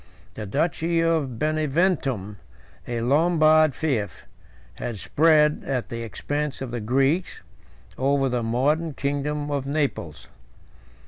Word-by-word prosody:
The 105 - -6
duchy 165 - 0
of 160 -7 0
Beneventum, 150 - 0 0.5
a 120 -1 -2
Lombard 155 +2 +4
fief, 125 -10 -2 0.5
had 120 -3 -5
spread, 150 +5 +3
at 130 -3 -3
the 115 0 -5
expense 145 +6 -3
of 135 -3 -5
the 120 - -3
Greeks, 135 - 0 0.6
over 135 +1 +2
the 125 -2 -1
modern 140 +7 0
kingdom 145 +1 -2
of 140 -2 -2
Naples. 140 - -2
140 Hz, 115 wpm, -24 LUFS, 120-155 Hz, 0.6 s, Lombard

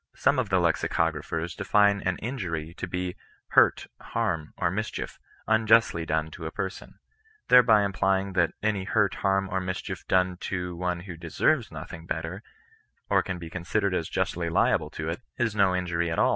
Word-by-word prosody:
Some 140 - +2
of 120 -6 -1
the 95 -1 +3
lexicographers 80 -1 0
d^ne 100 +1 +3
an 95 - 0
« - - -16
injury*^ 85 - -4
to - - -4
be 90 0 -3 0.2
'' - - -36
hurt, - - +4 0.2
harm, 80 -3 -2
or 85 - +1
mischief, 110 +4 -4 0.3
unjustly 110 -6 +3
done 80 0 0
to 80 0 -6
a - - -5
person 95 -2 -6 0.3
;" 440 -1 -34
thereby 115 -4 +7
implying 95 0 0
that 85 -2 +2
any 105 -3 0
hurt, 100 -1 +2
hum, 95 0 +2
or 95 - 0
mischief 95 0 -5
done 90 -1 +2
to 90 -1 -4
one 90 0 -2
who 90 -1 -8
deserves 80 -1 +1
nothing 80 0 -8
better, 80 +5 -4 0.7
or - - +5
can 95 -2 -4
be 85 -1 -9
considered 90 +2 -1
as 85 -3 -1
justly 85 -1 -1
liable 80 - +2
to 80 - -5
it, 85 +8 -3 0.2
is 115 -3 0
no 95 -3 +3
injury 85 -2 -1
at 80 - -2
aU. - - +4
90 Hz, 185 wpm, -27 LUFS, 85-100 Hz, 0.7 s, thereby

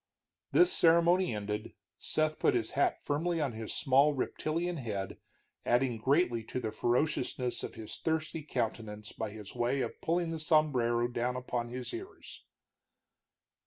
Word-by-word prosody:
This 360 0 +5
ceremony 170 -3 +4
ended, 105 +1 -4 0.2
Seth 155 0 0
put - - +3
his 115 -2 0
hat 140 - +1
firmly 165 +4 0
on 145 -4 0
his 110 -1 -5
small, 140 +1 +4
reptilian 165 +6 -2
head, 100 -7 -4 0.4
adding 120 -1 +1
greatly 130 -2 +2
to 125 - -3
the 110 -3 -3
ferociousness 125 +1 0
of - - -6
his 110 -1 -6
thirsty 160 0 -1
countenance 110 -6 -3
by 110 - -4
his 105 -1 -9
way 125 +3 0
of - - -4
pulling 170 0 0
the 165 - -3
sombrero 130 -7 +2
down 120 +1 -1
upon 125 -2 -3
his 125 +1 -5
ears. 375 +2 -9
125 Hz, 145 wpm, -32 LUFS, 115-155 Hz, 0.4 s, This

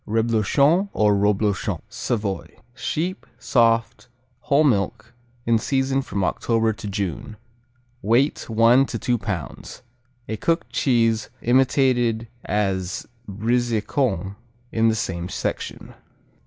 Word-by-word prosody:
Reblochon 115 - +2
or 105 -1 +3
Roblochon 105 0 0
Savoy 105 -6 -3 0.2
Sheep; 165 +7 -3
soft; 115 -1 +1 0.3
whole 145 +2 +2
milk; 110 -3 0 0.3
in 115 -1 +3
season 135 +2 0
from 100 -7 -3
October 115 +3 +1
to 105 0 -8
June. 100 +2 -4 0.6
Weight 120 +8 +1
one 115 +4 +5
to - - -4
two 120 -2 0
pounds. 100 - -6 0.4
A 110 - -3
cooked 165 - -1
cheese 115 -5 +2
imitated 120 -2 +2 0.2
as 95 -2 -1 0.2
Brizecon 110 - -1 0.3
in 115 0 +2
the 110 - +1
same 90 -4 -3
section. - - -4
115 Hz, 105 wpm, -23 LUFS, 105-125 Hz, 0.6 s, one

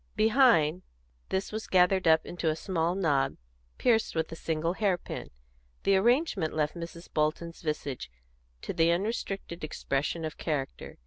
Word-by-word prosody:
Behind, 215 - +4 0.5
this 190 +1 -1
was 220 +1 -4
gathered 185 0 +4
up 160 0 +5
into 170 -2 -2
a 155 - +1
small 170 0 -1
knob 145 - +1 0.4
pierced 225 -6 +2
with 160 0 -1
a - - -5
single 165 +1 -1
hair 195 -3 +1
pin; - - -7 0.5
the 195 - +4
arrangement 215 - +2
left 150 -1 0
Mrs. 170 0 -8
Bolton's 155 +2 -1
visage 145 - -3 0.5
to - - -3
the 165 +1 +3
unrestricted 195 -2 -3
expression 155 +2 -2
of 155 - -6
character. 145 -5 -3
170 Hz, 145 wpm, -29 LUFS, 155-195 Hz, 0.5 s, up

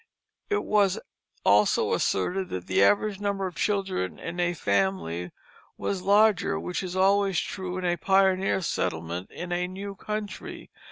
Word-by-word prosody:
It 415 0 +1
was 200 -3 +2 0.5
also 105 +1 +4
asserted 180 - 0
that 90 -1 -5
the - - +2
average 205 - +3
number 200 -1 -1
of 185 - -4
children 195 - -1
in 170 +1 -6
a 175 0 +1
family 95 - 0 0.5
was 195 -2 -2
larger, 205 - +3
which 85 +2 -3
is 185 -1 -5
always 195 -1 +3
true 185 -1 -4
in 185 - -3
a 175 0 +1
pioneer 190 +1 +2
settlement 85 - -3
in 175 0 -7
a 175 0 0
new 195 +2 -6
country. 210 +1 -6
185 Hz, 150 wpm, -27 LUFS, -, 0.5 s, also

